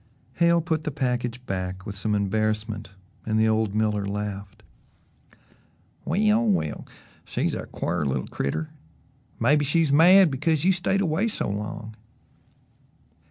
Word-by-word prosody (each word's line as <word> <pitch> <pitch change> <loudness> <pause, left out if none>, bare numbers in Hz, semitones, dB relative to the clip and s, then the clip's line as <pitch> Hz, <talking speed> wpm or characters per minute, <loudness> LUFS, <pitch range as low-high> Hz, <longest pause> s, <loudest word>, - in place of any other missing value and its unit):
Hale 170 0 +4
put 160 -1 -1
the - - -2
package 125 -3 -2
back 95 -1 -4
with 100 -2 -6
some 105 +2 -1
embarrassment 110 +1 -1 0.3
and 110 0 0
the 110 - +4
old 110 -2 +1
miller 105 -2 +1
laughed. 100 -1 -5 1.4
"Well, 210 +6 +2
well 185 - -1 0.4
she's - - -2
a - - -5
quar 85 -2 -2
little 65 -3 -1
critter; 155 - -3 0.7
mebbe 145 +6 +3
she's 145 +1 +1
mad 180 +3 +7
because 155 +4 0
you 190 - +5
stayed 195 +2 0
away 180 +4 +1
so 225 - -3
long." 105 +2 -5
115 Hz, 130 wpm, -25 LUFS, 105-160 Hz, 1.4 s, mad